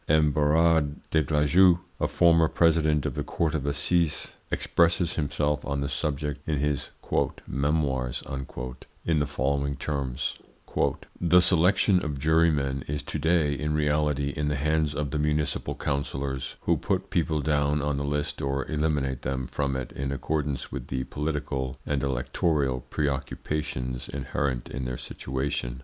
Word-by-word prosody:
M. 75 0 +4
Berard 75 0 +3 0.2
des 80 - +4
Glajeux, 80 +5 +5 0.2
a - - +2
former 85 -2 +5
President 80 -3 +3
of - - -1
the - - -2
Court 80 -3 -1
of 70 -3 -2
Assizes, 75 +3 +1
expresses 85 0 +2
himself 75 -1 0
on 70 -1 -2
the 70 - -1
subject 75 +1 -2
in 75 - +1
his 75 0 -1 0.6
"Memoirs" 70 -3 0 0.8
in 80 -2 +2
the 75 - 0
following 70 +1 0
terms: 70 -2 -2 0.8
"The 90 +1 +6
selection 90 +2 +4
of 75 -2 -3
jurymen 75 -3 +2
is 75 0 -3
to - - -4
day 80 -3 +2
in 75 +2 -1
reality 75 -1 +1
in 75 0 -1
the 75 - 0
hands 75 +1 +1
of 75 -2 -2
the 75 - -1
municipal 75 0 0
councillors, 70 -2 -2
who - - +2
put - - -2
people 80 -2 +1
down 75 0 +1
on 75 -1 0
the 70 - -1
list 75 0 -2
or 70 0 -1
eliminate 75 -4 0
them 65 0 -2
from 70 +1 -2
it 65 -2 -4
in 70 0 -3
accordance 70 0 -2
with - - -5
the 65 0 -2
political 70 -3 -3
and 70 -2 0
electoral 70 +1 0
preoccupations 65 -3 -2
inherent 65 -2 -2
in 65 -2 -5
their 60 0 -3
situation. 65 -2 -3
75 Hz, 150 wpm, -27 LUFS, 70-75 Hz, 0.8 s, The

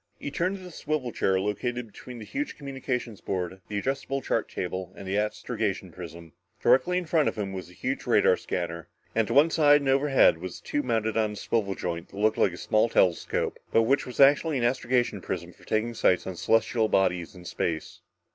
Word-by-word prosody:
He 145 - -5
turned 185 +6 -1
to 185 - -12
the 180 - -9
swivel 150 -6 -3
chair 95 -3 +1
located 120 +5 -2
between 120 +3 -11
the 110 - -8
huge 290 - -4
communications 130 -6 -4
board, 95 0 -3
the 105 - -3
adjustable 135 +4 -2
chart - - -1
table 95 0 -4
and 95 - -9
the 95 - -1
astrogation 105 -2 -2
prism. 85 -1 -10 0.3
Directly 135 +9 +3
in 180 - -1
front 160 -2 +2
of - - -7
him 100 -2 -3
was 95 -2 -6
the 90 - -16
huge - - -3
radar - - +5
scanner, 85 -2 -4 0.3
and 110 -2 +1
to 115 - -2
one 150 +4 +6
side 145 -2 +5
and 140 - -1
overhead 135 - +4
was 90 +1 -6
a - - -27
tube 145 -1 -2
mounted 110 -2 0
on 110 -1 +1
a - - -7
swivel 100 -2 -1
joint 85 -1 -4
that 100 - -13
looked 110 +1 +2
like 95 - +4
a - - -8
small 110 +4 +2
telescope, 90 -6 +1
but 115 - +4
which 135 +4 +1
was 125 - -8
actually 145 +2 +5
an 120 - -1
astrogation 120 -4 +1
prism 85 -1 -5
for - - -20
taking 110 +2 0
sights 90 -5 +2
on 95 - -4
the - - -14
celestial 110 +2 +2
bodies 90 -4 +1
in 90 -1 -12
space. 80 -2 -3
110 Hz, 215 wpm, -27 LUFS, 95-135 Hz, 0.3 s, one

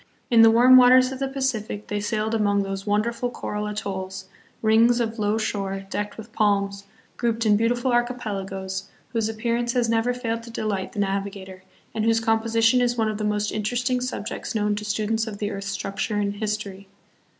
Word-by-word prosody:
In 230 -1 +7
the 225 - +8
warm 245 +3 +7
waters 255 +1 +6
of 265 - -6
the 270 - -1
Pacific 255 -6 -3
they 210 - -3
sailed 215 +1 -1
among 205 -2 +2
those 195 +1 -5
wonderful 230 +4 0
coral 210 -3 -4
atolls, 190 -2 -5 0.4
rings 230 +2 +4
of 230 -1 -2
low 210 +1 +1
shore, 195 -3 -3
decked 205 0 -3
with 220 0 -10
palms, 200 -1 +1 0.3
grouped 230 -1 0
hi 215 - +3
beautiful 240 +4 +2
archipelagoes, 195 -6 -2 0.2
whose 225 -2 -1
appearance 235 +2 -1
has 240 -2 +1
never 230 +2 +2
failed 230 -2 -3
to 230 - -11
delight 205 -4 -3
the - - -5
navi 200 0 -1
gator, 190 -1 -11 0.3
and 220 - -1
whose 225 0 +3
composition 225 +2 +2
is 245 0 +1
one 220 -1 +1
of 215 0 -4
the - - -2
most 210 0 0
interest 245 +4 -1
ing 250 0 +1
subjects 245 -3 -4
known 210 -1 +1
to 210 0 -4
students 215 +1 -1
of 210 -2 -6
the 205 0 -3
earth's 195 -1 -5
structure 195 +2 -3
and 205 0 -1
history. 205 -2 -4
215 Hz, 190 wpm, -24 LUFS, 205-235 Hz, 0.4 s, the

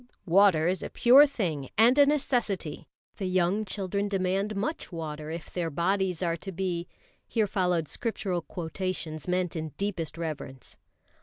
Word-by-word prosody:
"Water 180 -3 +5
is 185 +1 0
a - - -5
pure 270 +5 +7
thing 165 - -3
and 235 +4 +6
a 285 - +7
necessity. 240 - -1 0.3
The 190 - -2
young 185 +3 +1
children 200 +1 -2
demand 195 +1 0
much 225 +8 -3
water 155 -2 -5
if 165 -1 -7
their 170 -2 -1
bodies 185 +3 0
are 170 -1 0
to 195 +4 -7
be" 175 -1 -2 0.4
here 225 -3 +1
followed 180 -5 0
Scriptural 195 -5 -2
quotations 165 -2 -4
meant 180 -1 0
in 155 -2 -4
deepest 185 -6 -3
reverence. 150 -5 -6
185 Hz, 150 wpm, -28 LUFS, 165-200 Hz, 0.4 s, pure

